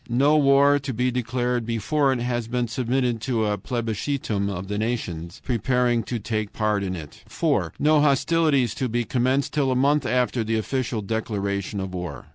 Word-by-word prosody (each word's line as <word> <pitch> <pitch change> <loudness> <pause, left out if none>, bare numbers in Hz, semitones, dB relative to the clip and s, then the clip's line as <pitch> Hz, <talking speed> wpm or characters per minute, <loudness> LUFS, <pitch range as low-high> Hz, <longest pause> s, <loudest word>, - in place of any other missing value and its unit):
No 140 +6 +3
war 140 0 +5
to 135 -1 -4
be 125 +2 +1
declared 125 0 -1
before 125 +6 +1
it 130 -2 -1
has 120 -2 -2
been 120 0 -1
submitted 125 0 -1
to 115 -3 0
a 105 0 +1
plebiscitum 110 -1 -2
of 95 -1 -5
the 105 +1 -2
nations 90 -7 -4
preparing 125 0 +1
to 120 +5 -3
take 110 -1 -3
part 105 -2 0
in 95 -1 -2
it. 75 -4 -10
4. - - 0
No 150 0 +4
hostilities 145 -3 +2
to 130 - -2
be 120 +1 0
commenced 130 +4 0
till 140 -3 +1
a - - +1
month 140 +1 +2
after 125 -2 +1
the 110 +1 0
official 115 -1 -2
declaration 100 -2 -2
of 95 -1 -4
war. 90 -7 -6
120 Hz, 180 wpm, -24 LUFS, 105-130 Hz, -, war